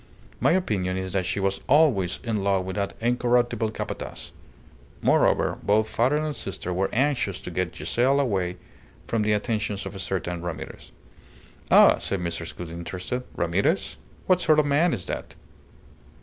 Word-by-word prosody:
My - - +3
opinion 95 - 0
is 95 -1 -4
that 95 -2 0
she - - -1
was 100 0 -1
always 130 - +3
in 110 -5 -1
love 95 -2 +1
with 95 - -5
that 100 -1 -2
incorruptible 120 -1 +1
Capataz. 110 - -6 0.7
Moreover, - - +2
both 105 +2 +2
father 125 +7 +1
and 155 -1 -2
sister 90 -2 -4
were 95 +2 0
anxious 125 -7 0
to - - -7
get 90 0 -2
Giselle 130 +4 +1
away 95 -9 0 0.5
from 115 - 0
the 105 0 +2
attentions 105 -1 -1
of - - -6
a 95 - -8
certain 90 -2 -3
Ramirez." 80 -2 -7 0.8
"Ah!" - - +7
said 100 - -2
Mrs. 85 -1 -4
Gould, 85 -2 -6
interested. 90 +8 -4
"Ramirez? 95 - 0 0.3
What 185 -1 +3
sort 155 -3 +4
of 150 - +4
man 150 +5 +3
is 90 - -3
that?" - - -5
100 Hz, 160 wpm, -25 LUFS, 90-125 Hz, 0.8 s, Ah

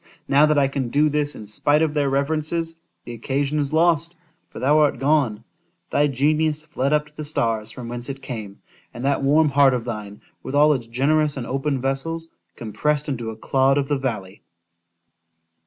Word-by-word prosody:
now 140 +2 +5
that 150 -1 +2
I 140 -1 +4
can 135 -2 -3
do 150 +5 +3
this 145 0 -1
in 105 - -9
spite 145 +9 +1
of 155 -2 0
their 145 -2 +1
reverences—the 155 +1 -3
occasion 140 +5 -1
is 145 -1 -1
lost—for 165 +1 -1
thou 145 +4 +3
art 150 -4 +3
gone;—thy 140 +1 -1
genius 155 +3 0
fled 140 -3 -2
up 150 0 +2
to 150 0 -22
the 155 - -6
stars 115 -7 -1
from 120 +1 -8
whence 120 +2 -6
it 135 0 -5
came;—and 120 0 -9
that 140 0 +1
warm 150 +3 +4
heart 135 -2 +4
of 120 -2 -4
thine, 105 -3 -6 0.2
with 135 - -5
all 150 +1 +5
its 120 -5 -4
generous 145 +5 +1
and 125 - -4
open 135 +1 -1
vessels, 160 +5 -2 0.3
compressed 145 +6 -1
into 120 -5 -3
a 110 - -7
_clod 135 +3 +2
of 140 0 -1
the 145 -2 0
valley! 105 -7 -4
140 Hz, 175 wpm, -22 LUFS, 125-150 Hz, 0.3 s, now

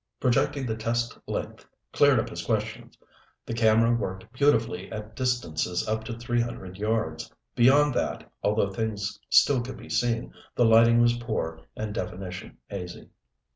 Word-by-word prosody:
Projecting 135 +2 +1
the 110 -2 -2
test 115 +1 -1
length - - -4 0.3
cleared - - +5
up - - -2
his - - -5
questions. - - -3 0.5
The - - -4
camera 115 +1 +4
worked 95 -1 -5
beautifully 115 -9 +1
at 110 0 -7
distances 110 -9 -1
up 110 +1 -1
to 115 -1 -5
three 120 0 0
hundred 95 -6 -6
yards. 105 -8 -2 0.2
Beyond 140 +4 +5
that, - - -2
although 105 -1 +1
things 105 0 -3
still 135 -4 +5
could 125 +2 -7
be - - -12
seen, 120 -1 0 0.2
the 120 - +4
lighting 115 +1 +6
was 120 0 +3
poor 80 -9 -3 0.2
and 110 -1 -3
definition 90 -1 -6
hazy. 90 -3 -7
115 Hz, 150 wpm, -27 LUFS, 100-120 Hz, 0.5 s, lighting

